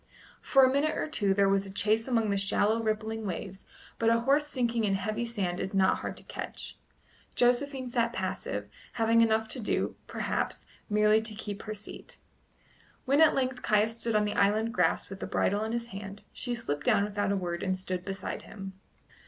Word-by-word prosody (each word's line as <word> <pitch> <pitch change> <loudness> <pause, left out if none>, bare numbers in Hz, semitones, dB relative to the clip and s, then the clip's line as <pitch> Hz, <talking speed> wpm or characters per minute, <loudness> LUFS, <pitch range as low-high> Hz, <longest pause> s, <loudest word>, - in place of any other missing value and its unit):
For 270 -1 +5
a 260 - +2
minute 305 +2 +1
or - - -1
two 205 -10 +1
there 200 0 +4
was 195 0 +2
a - - -8
chase 215 +4 +1
among 225 -4 +1
the - - +1
shallow, 205 +3 +2
rippling 220 0 -2
waves, 190 0 -5 0.3
but 230 - +3
a 230 0 +3
horse 280 +4 +3
sinking 235 -5 0
in 200 -2 +2
heavy 215 +5 -2
sand 190 -6 -2
is 190 - -3
not 190 -1 +3
hard - - -5
to - - -7
catch. - - -7 0.6
Josephine 255 +2 +2
sat 235 -1 +1
passive, 185 - -3 0.3
having 230 0 +3
enough 220 -1 +3
to 255 - -5
do, 215 - -1
perhaps, - - -2 0.2
merely 210 +1 +4
to 220 -1 -3
keep 205 -1 -5
her 215 0 -5
seat. 205 - -9 0.9
When 280 +3 +4
at 320 - +6
length 255 -1 -1
Caius 215 +2 +2
stood 230 -2 -1
on 210 0 +3
the 210 - -1
island 215 +3 +2
grass 180 -5 +2
with 195 0 -8
the - - -4
bridle 205 +2 +1
in 220 - -3
his 235 0 -2
hand, 200 0 -7
she 245 -1 -3
slipped 145 -11 -3
down 200 - +4
without 205 -1 -1
a 200 - +1
word 175 -2 -3
and 185 -1 0
stood 185 -1 -3
beside 195 -1 -4
him. 195 -2 -9
215 Hz, 200 wpm, -29 LUFS, 195-235 Hz, 0.9 s, at